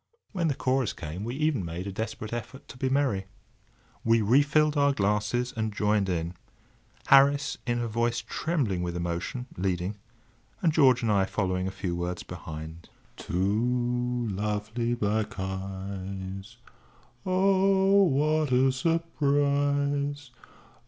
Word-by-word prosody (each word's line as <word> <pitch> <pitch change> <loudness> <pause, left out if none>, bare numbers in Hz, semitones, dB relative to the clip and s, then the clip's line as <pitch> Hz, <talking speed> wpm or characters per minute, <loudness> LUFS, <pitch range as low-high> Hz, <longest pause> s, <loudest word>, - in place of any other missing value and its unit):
When 175 -5 0
the 145 - 0
chorus 130 -3 0
came 80 +5 -6
we 120 +3 -4
even 150 -7 0
made 85 +2 -5
a 100 - -4
desperate 110 +2 -5
effort 130 +4 -6
to 125 - -10
be 130 - 0
merry. 130 -9 +1 0.8
We 115 -1 +3
re 120 +7 +5
filled 150 +1 +2
our 140 -1 +3
glasses 105 +3 0
and 110 -1 -1
joined 105 -1 +1
in; 85 -1 -2 0.7
Harris, 140 +1 +5
in 120 0 +1
a 120 -1 -1
voice 115 +1 0
trembling 130 - -1
with 90 -1 -3
emotion, 85 +8 -3
leading, 90 +2 -1 0.6
and 165 -4 +2
George 130 -6 +5
and 110 - +2
I 100 -2 +3
following 95 -2 -1
a - - -1
few 95 -2 -4
words 85 +1 -3
behind: 80 -1 -8 0.3
"Two 120 +5 0
lovely 105 +4 -2
black 110 -2 -1
eyes; 95 +2 -5 0.7
Oh! 195 +1 +4
what 155 -3 +2
a 130 +1 +4
surprise! 145 -2 0
120 Hz, 130 wpm, -27 LUFS, 95-140 Hz, 0.8 s, re